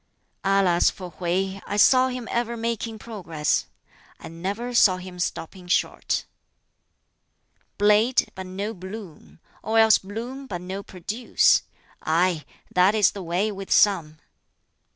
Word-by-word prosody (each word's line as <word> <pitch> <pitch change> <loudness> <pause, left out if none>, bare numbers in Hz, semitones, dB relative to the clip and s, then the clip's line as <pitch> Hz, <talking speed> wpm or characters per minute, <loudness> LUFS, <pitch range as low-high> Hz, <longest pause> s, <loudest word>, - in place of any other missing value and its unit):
"Alas 195 -3 +3
for 180 -2 -9
Hwķi! 190 +3 -2
I 205 - -2
saw 255 +5 +6
him 250 -2 -5
ever 235 0 -1
making 230 -1 -3
progress. 165 -10 -2 0.5
I - - -9
never 200 +9 -4
saw 195 -6 +5
him 185 -1 -10
stopping 180 +1 -4
short. 180 - 0 1.5
"Blade, 210 +5 +3
but 190 -1 -7
no 200 +4 -4
bloom 185 - -10 0.2
or 220 +2 -1
else 220 -1 +6
bloom, 240 +7 -7
but 175 -6 -5
no 190 +2 -5
produce; 200 +6 +1 0.4
aye, 165 0 +1 0.3
that 185 +4 +4
is 210 -3 +4
the 200 - -7
way 180 +5 -1
with 195 -1 -8
some! 165 -7 +3
195 Hz, 130 wpm, -24 LUFS, 180-220 Hz, 1.5 s, saw